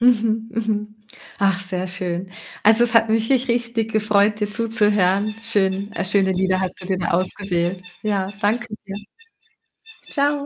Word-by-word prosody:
Mhm, 225 -2 +2
mhm. 210 -2 -2 0.4
Ach, 195 -2 +2
sehr 185 -1 0
schön. 180 0 -3 0.3
Also, 225 +3 +6
es 235 - 0
hat 225 0 +5
mich 225 +1 +1
rich 260 -1 +2
richtig 235 -2 -1
gefreut, 210 -1 +2
dir 210 -1 -2
zuzuhören. 210 -2 +1
Schön, 200 -2 +1
äh, 195 - -2
schöne 190 0 +2
Lieder 185 0 +1
hast 185 -1 -3
du 180 - -8
dir 190 -1 0
da 170 - -2
ausgewählt. 180 0 -1 0.2
Ja, 200 -3 0
danke 225 +4 0 0.2
dir. 195 - -6 1.2
Tschau. 285 0 +1
210 Hz, 155 wpm, -21 LUFS, 190-225 Hz, 1.2 s, Also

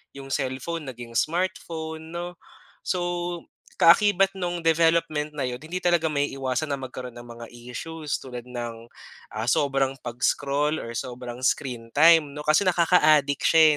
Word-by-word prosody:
Yung 135 0 -9
cellphone 140 +5 -3
naging 120 -2 -8
smartphone 160 -2 -2
'no. 175 0 -5 0.5
So 180 - 0 0.8
kaakibat 195 +2 +6
nung 175 -1 -2
development 165 -2 +2
na 145 - -2
'yon, 125 - -4
hindi 165 +4 -4
talaga 175 -2 +3
maiiwasan 140 0 -1
na 140 - 0
magkaroon 130 -1 -7
ng 120 - -10
mga 120 0 -9
issues 145 +6 -5
tulad 125 -2 -8
ng, 120 -2 -6 0.5
ah 110 +2 -3
sobrang 135 -2 +1
pag-scroll 140 +5 0
or 115 - -6
sobrang 125 0 -6
screen 125 -4 -1
time 160 +1 +6
'no, 150 0 -7
kasi 155 +5 +4
nakaka-adik 155 -6 +4
siya 160 -1 +6
145 Hz, 140 wpm, -25 LUFS, 125-165 Hz, 0.8 s, kaakibat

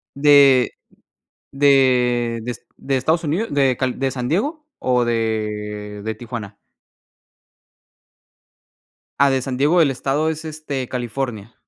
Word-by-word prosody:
¿De 140 -3 +5 0.8
de 125 -4 +3
de 120 - -4
Est 120 - -8
de 135 0 -2
Estados 160 +6 +1
Unidos, 180 +10 -2
de 135 -3 +2
Cal 130 -1 -2
de 135 0 +1
San 125 -1 -4
Diego 290 - -1
o 125 -1 +2
de 105 -2 -3
de 110 0 -3
Tijuana? 110 -3 -7 2.6
Ah, 140 0 +5
de 135 -1 +1
San 130 0 -4
Diego, 155 +6 +3
el 140 - +3
estado 140 +4 -1
es, 160 0 -4
este, 150 -5 -5
California. 120 -3 -4
130 Hz, 130 wpm, -20 LUFS, 120-145 Hz, 2.6 s, De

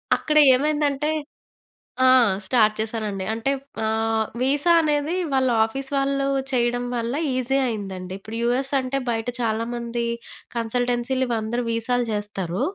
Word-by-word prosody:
అక్కడ 305 0 0 0.2
ఏమైందంటే 295 +1 0 0.9
ఆ! - - +6 0.4
స్టార్ట్ 215 0 +3
చేశానండి. 215 -3 -3
అంటే 230 +4 -2 0.4
ఆహ్, 220 0 +1 0.2
వీసా 285 +6 +3
అనేది 300 +2 0 0.2
వాళ్ళ 260 -1 +2 0.2
ఆఫీస్ 270 +4 -5
వాళ్ళు 275 0 +1 0.2
చేయడం 245 -1 +1
వల్ల 235 0 -2 0.2
ఈజీ 255 +1 +1
అయిందండి. 190 -5 -5
ఇప్పుడు 220 +3 -7
యూఎస్ 260 +3 0
అంటే 260 +1 -2
బయట 225 0 -2
చాలామంది 235 +1 -2 0.5
కన్సల్టెన్సీలు 245 +2 0
ఇవందరూ 230 +1 -1
వీసాలు 240 +2 0
చేస్తారు. 200 -4 -3
240 Hz, 120 wpm, -23 LUFS, 220-270 Hz, 0.9 s, ఆ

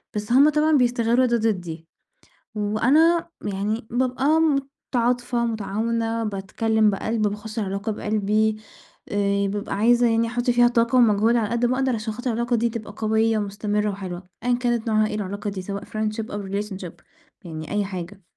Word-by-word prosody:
بس 210 +2 -3
هم 280 +4 +6
طبعًا 305 +1 +2
بيستغلوا 240 0 +2
ده 240 -1 +2
ضدي، 175 -7 -2 0.7
وأنا 270 +12 +3
يعني 210 +3 -2
بابقى 260 +6 +1 0.5
متعاطفة 245 0 +1
متعاونة 225 +1 -1
باتكلم 215 +2 +1
بقلب، 220 +3 -2
باخُشّ 210 +2 -6
العلاقة 200 +1 -2
بقلبي، 215 +1 0 0.5
آآ، 200 0 +1
بابقى 205 +1 -3
عايزة 240 +4 +4
يعني 225 0 +2
أحُطّ 240 +2 -1
فيها 240 0 +5
طاقة 235 +1 +2
ومجهود 225 0 +4
على 220 -3 +1
قد 235 +2 0
ما 255 +1 0
أقدر 265 -1 +1
عشان 220 0 -3
خاطر 245 +2 -3
العلاقة 235 +1 0
دي 235 +1 +1
تبقى 215 -2 -7
قوية 220 0 +1
ومستمرة 210 +1 -1
وحلوة، 185 -2 -6 0.2
أيًا 245 - +2
كانت 240 -2 -1
نوعها 215 -1 +3
ايه 210 - -4
العلاقة 205 0 -3
دي 190 -2 -6
سواء 200 +1 -5
friendship 215 +1 -3
أو 205 0 -4
relationship 195 -3 -4 0.5
يعني 155 -2 -7
أي 205 0 0
حاجة، 190 +1 -7
220 Hz, 160 wpm, -23 LUFS, 205-240 Hz, 0.7 s, هم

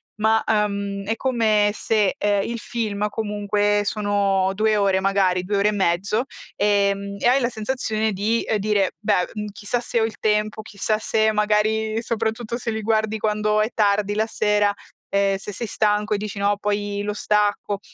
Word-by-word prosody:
ma, 220 +1 +2
uhm, 200 -2 -1
è 220 - -1
come 220 -5 +2
se, 215 -3 +1
ehm, 205 -1 +1
il 235 +2 -4
film 210 -3 -2
comunque 205 -1 0
sono 200 -2 +1
2 215 +1 +2
ore 195 -2 +2
magari, 190 -2 +1
2 200 +2 -1
ore 200 +1 +3
e - - 0
mezzo, 195 +3 0 0.3
ehm, 200 -1 +1
e - - +1
hai 260 +3 +4
la 240 - +1
sensazione 220 -1 -2
di, 215 +4 0
ehm, 220 - 0
dire: 200 -2 +1
"Beh, 205 -4 +1
mhmm, 210 -1 -4
chissà 210 +4 -3
se 235 - -1
ho 220 - +2
il 225 -1 -6
tempo, 215 0 0
chissà 215 +1 -2
se" 220 0 +1
magari 215 +1 +1
soprattutto 230 0 -2
se 240 - -4
li 220 0 -3
guardi 220 0 0
quando 210 0 0
è 215 - +1
tardi 205 -1 +2
la 220 +1 0
sera, 210 -2 +2 0.4
ehm, 200 0 +1
se 195 - -7
sei 220 +4 -4
stanco 210 0 +1
e - - +1
dici: 205 -1 -6
"No, 200 +1 +1
poi 205 0 -2
lo 210 0 -2
stacco." 205 -1 0
210 Hz, 180 wpm, -22 LUFS, 200-220 Hz, 0.4 s, hai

